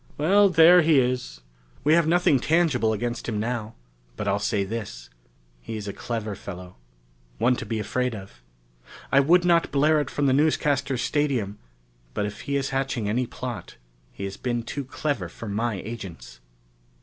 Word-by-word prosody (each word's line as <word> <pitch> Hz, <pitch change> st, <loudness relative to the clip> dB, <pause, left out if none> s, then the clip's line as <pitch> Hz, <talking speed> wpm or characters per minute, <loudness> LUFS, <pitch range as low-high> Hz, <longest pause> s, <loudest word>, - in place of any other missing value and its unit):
"Well, 195 Hz, +7 st, +4 dB
there 175 Hz, +1 st, +7 dB
he 155 Hz, -3 st, +4 dB
is. 125 Hz, -, -2 dB, 0.4 s
We 150 Hz, -, +4 dB
have 170 Hz, -1 st, +4 dB
nothing 170 Hz, -5 st, +3 dB
tangible 150 Hz, -7 st, +2 dB
against 120 Hz, +3 st, -3 dB
him 105 Hz, -2 st, -2 dB
now. 115 Hz, -1 st, -3 dB, 0.4 s
But 105 Hz, -, -4 dB
I'll 100 Hz, +1 st, +1 dB
say 100 Hz, 0 st, 0 dB
this: 95 Hz, -, -6 dB, 0.5 s
he's 105 Hz, -, -6 dB
a 100 Hz, -, -4 dB
clever 110 Hz, -3 st, -4 dB
fellow, 90 Hz, -2 st, -9 dB, 0.6 s
one 125 Hz, -, +3 dB
to -, -, -6 dB
be 115 Hz, -, -2 dB
afraid 125 Hz, +2 st, -1 dB
of. 95 Hz, -, -11 dB, 0.7 s
I 135 Hz, -, +6 dB
would 175 Hz, +6 st, +4 dB
not 170 Hz, -1 st, +3 dB
blare 150 Hz, +2 st, +3 dB
it 145 Hz, -, -4 dB
from 145 Hz, -, -1 dB
the 135 Hz, -, +3 dB
newscasters' 140 Hz, -3 st, +1 dB
stadium, 130 Hz, -11 st, -1 dB, 0.6 s
but 105 Hz, -, 0 dB
if 105 Hz, +1 st, -6 dB
he 140 Hz, -, -3 dB
is 140 Hz, -1 st, -1 dB
hatching 135 Hz, -5 st, -1 dB
any 120 Hz, +3 st, 0 dB
plot, 120 Hz, -9 st, -7 dB, 0.4 s
he -, -, -8 dB
has 100 Hz, 0 st, -5 dB
been 120 Hz, -2 st, -2 dB
too 140 Hz, +4 st, -5 dB
clever 130 Hz, -, -3 dB
for 115 Hz, -, -9 dB
my 110 Hz, +2 st, -1 dB
agents!" 95 Hz, -, -8 dB
120 Hz, 170 wpm, -25 LUFS, 105-145 Hz, 0.7 s, there